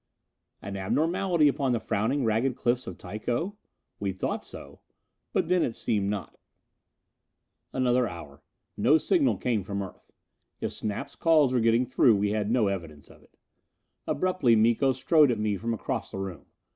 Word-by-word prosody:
An 100 0 -5
abnormality 165 - +1
upon 135 -2 +1
the 120 - 0
frowning 115 +6 -1
ragged 115 +4 +1
cliffs 125 +1 -1
of 90 - -7
Tycho? 120 - -3 0.4
We 100 -1 -1
thought 95 - -3
so. - - -11 0.5
But - - 0
then 180 -1 +2
it 115 - -1
seemed 100 -3 -1
not. 105 -2 -5 1.3
Another 125 -1 +2
hour. 80 -7 -10 0.3
No 150 +4 +4
signal 290 - +2
came 115 -5 -1
from 100 +1 -3
Earth. 95 - -12 0.5
If - - -3
Snap's 105 -2 -5
calls 155 -6 +3
were 125 - +3
getting 115 +2 +3
through 125 -2 +4
we 100 0 0
had 105 -1 -1
no 120 -2 +2
evidence 85 -7 -6
of - - -19
it. - - -27 0.7
Abruptly 165 -7 +2
Miko 115 +5 +3
strode 145 +3 +4
at 120 - 0
me 105 -1 0
from 115 +4 -3
across 115 - -3
the - - -7
room. 95 -6 -6
115 Hz, 160 wpm, -27 LUFS, 100-135 Hz, 1.3 s, No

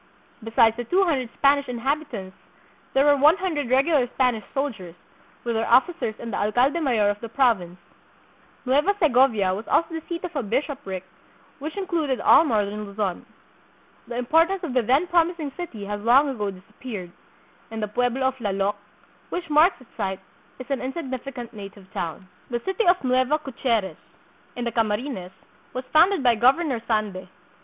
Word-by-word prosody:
Be 225 - -6
sides 225 -1 +5
the 240 - -3
two 365 - +2
hundred 270 -9 0
Spanish 280 0 +3
inhabitants 250 -6 -3 0.6
there 270 +1 +4
were 290 -1 +6
one 300 +6 +5
hundred 315 -10 -2
regular 270 0 +3
Spanish 245 -5 +1
soldiers, 215 -12 -4 0.5
with 235 - -1
their 225 0 -1
officers 260 -2 +3
and 230 -2 -7
the - - -1
alcalde 245 +10 +2
mayor 235 -9 +2
of 205 - -6
the 230 - -7
province. 220 -9 +1 0.9
Nueva 290 +10 +2
Segovia 250 - +3
was 210 +4 -6
also 330 - +2
the 325 - -4
seat 340 0 -4
of 355 -2 -6
a 280 - 0
bishopric 250 - -3 0.6
which 310 +6 -6
included 325 -9 -1
all - - +6
northern 210 -6 -1
Luzon. 200 -2 -3 0.8
The 240 - -5
importance 330 +9 +2
of 305 -7 -3
the 250 - +3
then 265 +9 +2
promising 340 -4 +1
city 250 - -6
has 205 0 -4
long 260 +6 +5
ago 210 -6 -2
disappeared, 190 0 -8 0.6
and 220 -1 -5
the - - -1
pueblo 245 +4 0
of 265 0 -1
Lallok, 200 -1 -1 0.5
which 340 -3 -5
marks 310 +5 +4
its 255 - -20
site, 190 0 -2 0.4
is 255 - -8
an 275 - -1
insignificant 260 -3 -5
native 195 -2 -11
town. 170 +3 -5 0.2
The 240 -1 -1
City 385 +3 0
of 355 -2 +4
Nueva 255 +3 +2
Caceres, 235 - -2 0.6
in 245 - -4
the 235 - -1
Camarines, 215 -3 -1 0.5
was 255 0 -4
founded 335 +1 +5
by 245 -2 +5
Governor 255 +2 +2
Sande. 210 -5 -1
255 Hz, 165 wpm, -24 LUFS, 215-295 Hz, 0.9 s, were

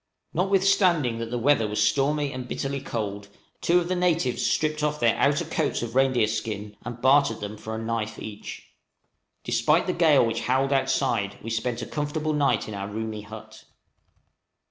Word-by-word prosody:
Notwithstanding 185 - +2
that 115 0 -4
the 120 - -2
weather 120 -2 +3
was 105 0 -3
now - - +4
stormy 145 +4 +1
and 130 -1 -6
bitterly 140 +2 -3
cold, 105 -6 -4 0.3
two 175 - +3
of 175 - -3
the 185 - 0
natives 170 -8 +1
stripped 155 0 0
off 150 0 0
their 115 -1 +3
outer 145 +4 +2
coats 160 -5 -1
of 115 -1 -5
reindeer 130 -3 +3
skin 105 -1 -4
and 120 0 -7
bartered 140 +3 +4
them 105 0 -5
for 110 +1 -6
a - - -4
knife 115 -1 -3
each. 105 -1 -8 0.7
Despite 155 +3 +2
the 185 - -1
gale 160 -7 +4
which 115 0 -2
howled 130 +3 +1
outside, 130 -7 0
we 115 - -5
spent 120 +1 -2
a - - -4
comfortable 150 +1 -2
night 145 -2 +1
in 110 - -6
our 100 -1 -4
roomy 110 +1 -4
hut. 105 +1 -12
130 Hz, 180 wpm, -25 LUFS, 110-150 Hz, 0.7 s, now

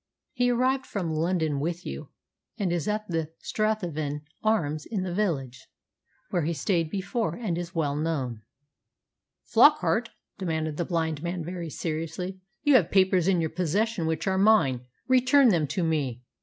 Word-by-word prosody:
He 245 0 +2
arrived 255 +2 +1
from 175 -6 -3
London 160 -2 0
with 170 +4 -3
you, 70 +1 -6 0.5
and 185 -4 0
is 175 +1 -2
at 210 0 -1
the 165 -2 -2
'Strathavon 170 -9 -2 0.2
Arms' 155 -9 0
in 205 -5 -2
the 180 -2 -3
village, 135 -11 -2 0.6
where 175 - +1
he 165 +2 0
stayed 165 +2 0
before, 195 -1 -2
and 215 -8 -2
is 175 +1 -5
well 145 -3 0
known." 140 -7 -2 1.0
"Flockart," - - +4 0.3
demanded 160 -4 -2
the 175 - -1
blind 160 -4 -1
man 170 -1 -3
very 175 -1 -5
seriously, 165 +4 -4 0.2
"you 290 -1 +4
have 175 -7 +1
papers 185 -2 +3
in 185 -3 +3
your 160 - -1
possession 185 +1 0
which 160 0 -1
are 190 -1 +1
mine. 195 - +4 0.3
Return 260 +1 +5
them 165 -7 +2
to 180 - -1
me." 140 -7 -1
170 Hz, 155 wpm, -27 LUFS, 155-200 Hz, 1.0 s, Return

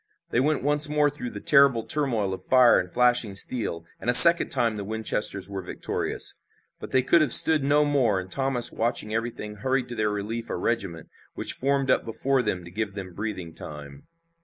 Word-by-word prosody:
They - - 0
went 150 +2 -1
once 150 +1 +1
more 150 -1 0
through 130 -4 -8
that 105 - -12
terrible 140 -5 +3
turmoil 115 -11 -2
of 95 - -9
fire 125 -2 +3
and 90 - -6
flashing 120 -3 0
steel, 95 -6 -1
and 120 - -5
a 125 - +5
second 170 +6 +9
time 115 -2 0
the 105 - -7
Winchesters 105 -2 -4
were 100 -1 -7
victorious. 90 - -3 0.4
But - - -10
they 130 -1 0
could 170 +5 +2
have 150 -6 0
stood 155 +1 +7
no 145 +2 +1
more, 130 -9 -1
and 95 0 -11
Thomas 135 -3 +4
watching 110 -1 -3
everything 110 -2 -6
hurried 130 +3 -3
to 120 - -7
their 110 -1 -2
relief 105 +3 -6
a - - -4
regiment, 95 -9 -5 0.3
which - - 0
formed 135 0 -1
up - - 0
before 130 +4 -2
them 95 -6 -4
to 85 - -13
give 105 +1 -6
them 95 -3 -9
breathing 95 -5 -7
time. 70 -3 -12
115 Hz, 200 wpm, -23 LUFS, 100-135 Hz, 0.4 s, second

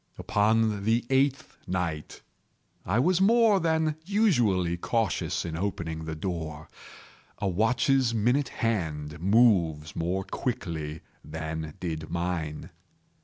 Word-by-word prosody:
Upon 105 0 +1
the 115 +3 +1
eighth 135 +2 +1
night 85 -5 -3 0.6
I 100 +5 +1
was 175 +8 +3
more 220 0 +5
than 160 -2 +1
usually 120 - +2
cautious 110 0 -1
in 80 -2 -4
opening 80 -3 -3
the 80 0 -4
door. 80 -2 -5 0.7
A 100 - -2
watch's 120 +6 +2
minute 120 +5 +1
hand 80 -8 -2
moves 90 -7 +3
more 90 +3 -1
quickly 85 - -4 0.2
than 80 0 -5
did 80 -3 -4
mine. 85 -3 -3
95 Hz, 110 wpm, -27 LUFS, 80-125 Hz, 0.7 s, more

